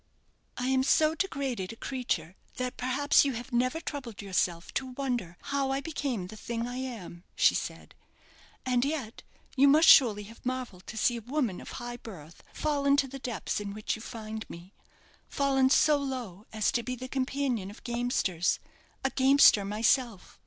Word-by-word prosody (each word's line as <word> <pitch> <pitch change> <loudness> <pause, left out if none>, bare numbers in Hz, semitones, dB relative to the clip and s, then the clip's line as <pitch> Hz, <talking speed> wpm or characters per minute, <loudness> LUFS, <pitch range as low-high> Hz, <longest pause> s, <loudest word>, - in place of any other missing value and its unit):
"I 245 - -2
am 265 0 +3
so 310 +3 +3
degraded 275 - -2
a - - -9
creature 225 - -3 0.2
that, 250 +1 -3
perhaps, 265 +4 +3
you 275 -2 0
have 245 +3 -7
never 255 +6 +1
troubled 265 -9 -6
yourself 180 -4 -1
to 260 -1 -3
wonder 245 -10 -3 0.2
how 275 -1 +1
I 270 0 0
became 275 - -3
the 185 - -10
thing 230 +2 -4
I 245 +1 -5
am," 225 -10 -6
she - - +5
said; - - -5 0.7
"and 250 -1 +2
yet 275 -6 -3 0.3
you 275 +1 +6
must 310 +3 +6
surely 215 -6 +7
have 225 +3 -14
marvelled 250 -7 -4
to 220 - -7
see 240 +2 +2
a - - -6
woman 245 -5 -2
of - - -9
high 240 0 -6
birth 170 -9 -11
fallen 285 -2 +1
to 275 - +2
the 275 +1 -8
depths 245 -5 -3
in 200 -1 -5
which 215 - -2
you 220 - -10
find 220 -2 -7
me; 175 +4 -11 0.6
fallen 270 -2 +2
so 300 +2 +5
low 250 -8 -5
as 215 -1 +1
to 240 - 0
be 250 +2 -4
the 255 +1 -7
companion 255 -6 -1
of 205 - -13
gamesters, 235 -8 0 0.5
a 270 - +1
gamester 265 -6 +6
myself. 220 +1 0
245 Hz, 175 wpm, -29 LUFS, 215-270 Hz, 0.7 s, surely